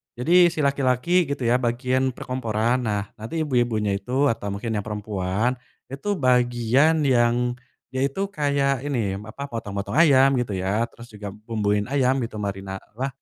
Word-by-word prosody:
jadi 170 +8 +5
si 160 -3 -2
laki-laki 140 +5 +2
gitu 140 -2 -3
ya 120 +1 +3
bagian 125 +1 0
perkomporan 120 -1 -1
nah 105 -4 -2
nanti 155 +9 -3
ibu-ibunya 120 -7 +1
itu 130 +7 +1
atau 100 -3 -4
mungkin 110 +3 -4
yang 105 -2 -1
perempuan, 105 +2 -1 0.4
itu 200 +10 -2
bagian 125 +4 +3
yang, 120 -1 +2 0.4
ya 130 - -1
itu 140 +9 -1
kayak 140 -4 +1
ini 115 -9 -1
apa 110 +6 -7
potong-potong 100 -5 -5
ayam 135 -4 +6
gitu 120 - -4
ya 95 +5 0
terus 115 - -13
juga 105 -1 -7
bumbuin 105 -1 -1
ayam 135 -1 +2
gitu 115 -3 -4
marina 95 -1 -4 0.2
lah, 135 - 0
125 Hz, 155 wpm, -24 LUFS, 105-135 Hz, 0.4 s, ayam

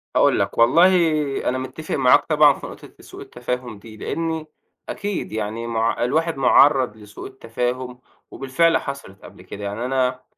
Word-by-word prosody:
هاقول - - +3
لك، - - -2
والله 145 +11 +5 0.6
أنا 130 - -1
متّفق 130 +4 -5
معاك 130 -2 +4
طبعًا 150 -2 +5
في - - -9
نقطة - - -13
سوء - - -12
التفاهم 125 -3 -6
دي، 110 0 -13
لإنّي 160 +2 -4 0.4
أكيد 205 -1 -4
يعني 110 +2 -4
مع 115 0 -1
الواحد 160 +5 0
مُعرّض 135 -3 +4
لسوء 105 0 -10
التفاهم 125 0 -4 0.3
وبالفعل 160 +5 +1
حصلِت 140 -9 -8
قبل - - -14
كده، 105 - -10
يعني 105 +4 -4
أنا 130 -1 -1
130 Hz, 150 wpm, -21 LUFS, 115-145 Hz, 0.6 s, والله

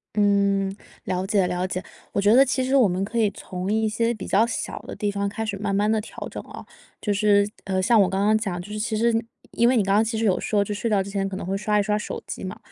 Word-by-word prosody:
嗯， 200 -1 +2 0.3
了 185 +1 -2
解 195 -3 +2
了 180 +1 -1
解。 185 0 -4 0.3
我 - - +1
觉 205 +2 +4
得 270 +2 +7
其 255 0 0
实 265 +2 0
我 250 -7 +5
们 185 +2 -1
可 235 +3 -3
以 215 -3 +3
从 185 0 -6
一 220 0 +1
些 230 +2 0
比 - - -7
较 220 +4 +3
小 - - -4
的 - - -9
地 205 -2 -1
方 200 0 -1
开 220 +2 -4
始 200 -2 -3
慢 200 -1 -2
慢 205 +2 +2
地 220 -1 +2
调 - - -12
整 - - -6
啊。 - - -10 0.4
就 205 - -1
是， 205 0 +3 0.2
呃， 190 -1 0
像 225 +3 +4
我 190 - +4
刚 195 +2 0
刚 215 +1 +4
讲， 195 -5 -2
就 205 +4 -9
是 215 - -4
其 220 0 -1
实 235 +1 +2 0.4
因 235 +1 +3
为 255 - +3
你 210 - +3
刚 195 0 +1
刚 215 - +5
其 225 0 -2
实 225 - 0
有 190 -4 +2
说 205 -2 +1
就 210 - -4
是 - - -6
睡 230 - 0
觉 200 -2 +3
之 200 - -8
前 195 -1 -1
可 190 - -5
能 185 - -6
会 195 +1 -1
刷 210 +1 +1
一 - - +3
刷 210 +1 0
手 - - -6
机 - - -6
嘛， 185 - -6
205 Hz, 315 characters per minute, -24 LUFS, 195-220 Hz, 0.4 s, 得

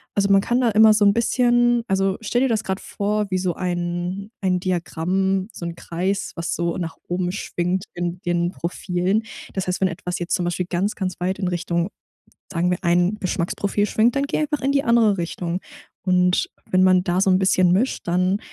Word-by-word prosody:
Also, 200 0 +2
man 195 - +7
kann 240 +5 +1
da 240 - +3
immer 220 0 +6
so 210 -1 +2
'n 200 0 +6
bisschen 240 +1 +3
Also, 195 0 +1
stell 225 +2 0
dir 265 - +3
das 225 -3 0
grad 190 -1 -2
vor 210 0 -2
wie 185 - 0
so 180 -2 -1
ein 175 +2 -3
ein 185 -2 0
Diagramm, 185 +2 -1
so 180 - -8
'n 170 0 -4
Kreis, 190 +4 -2
was 170 - -2
so 170 0 -1
nach 170 -3 -4
oben 180 0 -1
schwingt 180 -1 -2
in 175 0 -4
den 175 -1 0
Profilen. 180 +4 -1 0.3
Das 190 -1 -3
heißt, 180 +1 -2
wenn 190 - +3
etwas 180 0 -4
jetzt 175 0 -3
zum 180 -3 -2
Beispiel 175 +1 -1
ganz, 185 +4 -1
ganz 185 -3 -3
weit 185 +2 -1
in 185 -2 0
Richtung, 170 0 -1 0.6
sagen 175 -1 0
wir, 180 - 0
ein 175 +3 +2
Geschmacksprofil 195 +2 -1
schwingt, 230 +4 +2
dann 275 - +2
geh - - -1
einfach 295 -2 -1
in 275 - +1
die 280 0 +2
andere 230 -4 +4
Richtung. 175 +1 -3 0.5
Und 180 0 +3 0.2
wenn 185 0 +4
man 185 -1 +5
da 180 +1 +1
so 195 - +2
'n 185 - +4
bisschen 185 -2 +3
mischt, 210 +1 0
dann, 185 +3 +2
185 Hz, 205 wpm, -22 LUFS, 175-205 Hz, 0.6 s, man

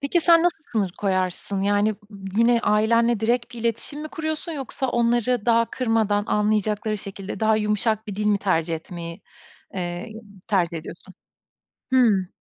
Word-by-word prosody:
Peki 285 +5 +1
sen 335 0 +5
nasıl 350 -1 +1
sınır 200 -5 0
koyarsın? 190 0 -1
Yani, 205 +1 +2 0.4
yine 235 0 +4
ailenle 230 +1 +3
direkt 240 +2 0
bir 235 - -7
iletişim 235 +6 -2
mi 310 - -5
kuruyorsun 315 +1 -4
yoksa 270 -2 -3
onları 240 -1 +1
daha 230 0 +4
kırmadan, 220 -4 +1
anlayacakları 210 0 0
şekilde 195 0 -7
daha 220 0 +3
yumuşak 215 +1 0
bir 205 - -5
dil 210 +1 -2
mi 205 -1 +3
tercih 165 -4 0
etmeyi, 170 +1 -8 0.5
eee, 175 +4 -4 0.4
tercih 175 -5 +1
ediyorsun? 175 +4 -11 0.8
Hı. 215 -8 +4
215 Hz, 145 wpm, -23 LUFS, 195-240 Hz, 0.8 s, sen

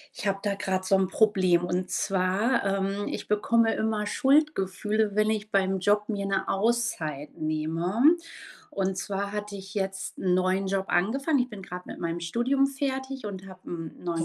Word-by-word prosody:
Ich - - -6
habe 195 0 0
da 205 -1 0
gerade 185 -1 -1
so 195 +1 +4
'n 190 - +2
Problem, 185 -3 +3
und 180 +1 -1
zwar, 195 +6 +1
ähm, 195 +1 0
ich - - -5
bekomme 225 +2 +3
immer 220 -1 -1
Schuldgefühle, 215 -8 +2
wenn 215 0 +3
ich 215 -1 -3
beim 195 -1 +2
Job 205 +3 +2
mir 200 -3 -2
'ne 195 0 -1
Auszeit 195 - -1
nehme. 165 - +2 0.5
Und 190 -1 -1
zwar 200 +2 -2
hatte 210 -1 -4
ich 195 0 -10
jetzt 190 -1 -3
'n 180 -1 +2
neuen 185 +1 +1
Job 190 0 -1
angefangen. 275 - +2
Ich 250 0 +1
bin 210 -5 -9
grad 180 -1 -8
mit - - -8
meinem 170 0 -2
Studium 240 +10 +2
fertig 265 -1 -3
und 195 -2 -6
habe 185 -1 -12
'n 165 -2 -7
neuen 170 -2 -1
195 Hz, 175 wpm, -27 LUFS, 185-220 Hz, 0.5 s, so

